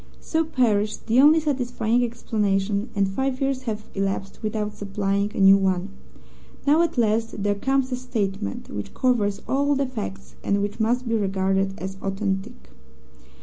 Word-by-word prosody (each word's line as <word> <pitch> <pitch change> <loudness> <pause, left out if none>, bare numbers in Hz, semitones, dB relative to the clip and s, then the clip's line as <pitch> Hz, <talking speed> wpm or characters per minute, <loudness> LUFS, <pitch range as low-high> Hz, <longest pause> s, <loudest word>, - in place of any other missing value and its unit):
So 320 0 0
perished 220 -9 0
the 235 +3 +4
only 305 +3 +7
satisfying 245 -5 0
explanation, 210 -3 -1
and 200 -1 +2
five 265 +6 -2
years 270 -1 0
have 215 -1 -4
elapsed 195 0 -3
without 215 -1 -2
supplying 200 0 -1
a - - -3
new 195 0 +8
one. 190 -1 0 0.8
Now, 300 +3 +5
at 340 -5 0
last, 225 -2 +1
there 205 0 +2
comes 270 +5 0
a - - +1
statement 205 - -3
which 100 0 -6
covers 215 -6 +1
all 285 +1 +2
the 275 0 +1
facts, 215 -7 -6
and 200 - +1
which 205 +2 -4
must 240 +3 +1
be 230 - 0
regarded 195 -2 0
as 190 0 -6
authentic. 195 +3 -3
215 Hz, 155 wpm, -24 LUFS, 195-255 Hz, 0.8 s, new